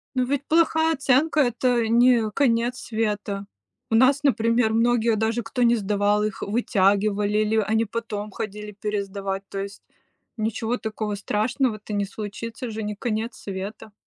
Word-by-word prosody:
Но 255 - +2
ведь 280 +2 -2
плохая 320 0 +3
оценка- 280 +2 +2
это 245 -3 +2
не 235 -1 +4
конец 240 0 +1
света. 210 -4 -3 0.4
У 225 - +2
нас, 265 +4 +5
например, 230 -4 +2
многие 230 0 +3
даже, 220 +2 0
кто 235 +2 -2
не 235 0 +5
сдавал, 205 0 +1
их 215 -1 -3
вытягивали 205 -1 +1
или 215 +1 +1
они 220 +1 +2
потом 215 -1 -4
ходили 210 +1 -6
пересдавать, 200 -1 -3
то 195 - -5
есть 200 +1 -7 0.6
ничего 225 +2 -1
такого 215 -2 -3
страшного-то 215 +1 -1
не 205 -1 0
случится, 225 +4 -6
же 220 0 -4
не 210 0 -3
конец 220 +1 -3
света. 200 +2 -7
220 Hz, 145 wpm, -24 LUFS, 210-240 Hz, 0.6 s, нас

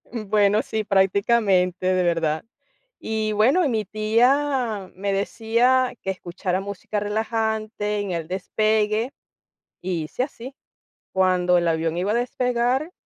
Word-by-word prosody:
Mm, 220 -4 -7
bueno, 210 0 +3
sí, 220 -1 -3
prácticamente, 190 -2 +2
de 185 0 +2
verdad. 165 -3 0 0.6
Y, 220 -1 -2
bueno, 260 - +3
y - - +1
mi 220 -3 -1
tía 230 0 +1
me 200 +2 -2
decía: 235 +5 +1
"Que 190 - -2
escuchara 185 0 -3
música 200 +1 -4
relajante, 215 0 -2
en 200 -2 -3
el 165 -2 -3
despegue", 215 +5 0 0.7
y 175 -3 -2
hice 155 - -3
así. 260 -1 -10 0.6
Cuando 180 -1 +3
el 170 - 0
avión 165 0 0
iba 190 +4 0
a - - 0
despegar, 250 +5 0
210 Hz, 135 wpm, -23 LUFS, 185-230 Hz, 0.7 s, bueno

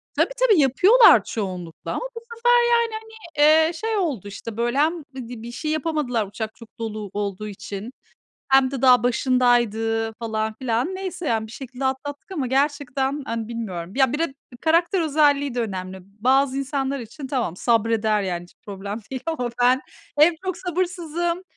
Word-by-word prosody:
Tabii, - - +2 0.2
tabii, 415 -8 +5
yapıyorlar 370 - +6
çoğunlukla 180 -6 -5
ama - - -3
bu - - -4 0.2
sefer 485 +1 +2 0.2
yani, 470 -1 +3
hani, 445 0 -8 0.5
eee, 340 - -3
şey 445 +6 -2
oldu, 290 - -2
işte 210 +2 -8
böyle, 240 +2 0
hem 315 +2 +1
bir 245 -3 -7
d 240 -3 -8
bir 235 +1 -7
şey 305 +5 -3
yapamadılar 300 -8 -1
uçak 220 +2 -6
çok 230 -1 -16
dolu 215 -3 -4
olduğu 205 0 -3
için, 200 +3 -7 0.6
hem 265 -1 +5
de 270 -2 -5
daha 250 -3 +6
başındaydı 235 -3 +2
falan 220 -1 -3
filan. 255 +8 -1
Neyse 370 -3 -5
yani, 220 -1 0
bir 220 - -12
şekilde 265 +1 -7
atlattık 280 +5 -3
ama 295 -8 -2
gerçekten, 275 +1 0
hani, 230 -1 -3
bilmiyorum. 190 -7 -5
Ya, 265 -3 +3
bir 295 - -1
de 325 -4 -1 0.3
karakter 340 +3 +2
özelliği 285 -4 +2
de 245 - 0
önemli. 190 -4 -4
Bazı 255 +8 +1
insanlar 275 0 -2
için 265 +5 -8
tamam, 245 - -2
sabreder 225 -2 +2
yani 175 -3 -2
hiç 175 - -17
problem 200 +1 -5
değil 260 -2 -5
ama 270 -7 -2
ben 255 +2 +4 0.4
hem 325 +3 +6
çok 375 -2 -2
sabırsızım, 345 -1 -2
255 Hz, 170 wpm, -23 LUFS, 220-305 Hz, 0.6 s, yapıyorlar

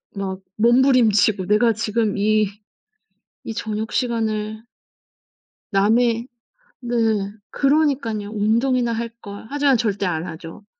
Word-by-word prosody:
막 195 -1 -4 0.2
몸부림치고 230 -4 +3
내가 215 +4 +3
지금 215 -1 -1
이, 215 +1 +2 1.0
이 225 - -5
저녁시간을 220 -1 -2 1.1
남의 230 +4 +2 0.5
네. 240 -1 -4 0.6
그러니까요. 275 -8 +1
운동이나 235 +3 +1
할걸. 225 -3 -7
하지만 285 -2 +3
절대 205 -3 -1
안 165 -1 -2
하죠. 165 +3 -9
220 Hz, 215 characters per minute, -21 LUFS, 205-240 Hz, 1.1 s, 몸부림치고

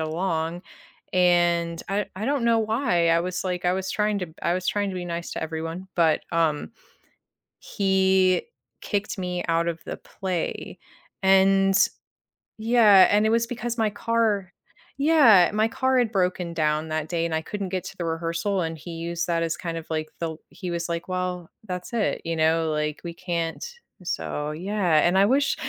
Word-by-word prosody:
along, 165 +1 -2 0.5
and 175 -2 +2
I 200 +1 -1
I 205 - -4
don't 275 -1 0
know 230 -1 +4
why. 215 -6 +1
I 165 0 +4
was, 180 +1 -3
like 180 -1 -3
I 180 - +3
was 190 0 -2
trying 210 -1 0
to 180 - -3
b 160 - -17
I 170 - +1
was 185 0 -3
trying 205 -1 0
to 185 - -5
be - - -5
nice 170 0 -5
to - - -4
everyone, 165 +3 -5
but, 160 -3 +3
um 165 +3 0 0.9
…he 190 -2 +2 0.4
kicked 205 +1 -2
me 180 -1 -3
out 165 0 +1
of 170 -1 -2
the - - -5
play, 185 -3 -4 0.5
and 195 0 +4 0.8
Yeah, 220 -4 +6
and 210 +1 +4
it 220 - +3
was 230 0 +2
because 240 0 -4
my 220 - +2
car 210 -4 0 0.5
Yeah, 275 - +6
my 215 +1 +2
car 260 +1 +1
had 235 -3 +1
broken 180 -3 0
down 155 0 0
that 155 0 -3
day 170 -1 0
and 165 - -3
I 160 - 0
couldn't 195 +3 -5
get 185 - -2
to 195 - -9
the 175 - -3
rehearsal, 165 +4 -1
and 165 -1 -3
he 170 +3 -9 0.2
used 170 0 -2
that 170 -1 +1
as 165 -1 -2
kind 165 -1 -2
of 165 - -7
like 155 -1 -2
the 165 -1 -2
l 160 - -10
he 185 -3 -7
was 170 0 -2
like, 170 0 -3
"Well, 180 -2 -3 0.2
that's 180 -3 -6
it," 225 -3 0
you 165 0 -1
know, 160 +1 +2
like, 150 0 -2
we 170 - -5
can't 170 -2 -3 0.4
So, 150 -3 -3
yeah, 180 0 +1
and 175 - +1
I 195 - +6
wish 275 +4 +2
180 Hz, 190 wpm, -25 LUFS, 165-205 Hz, 0.9 s, Yeah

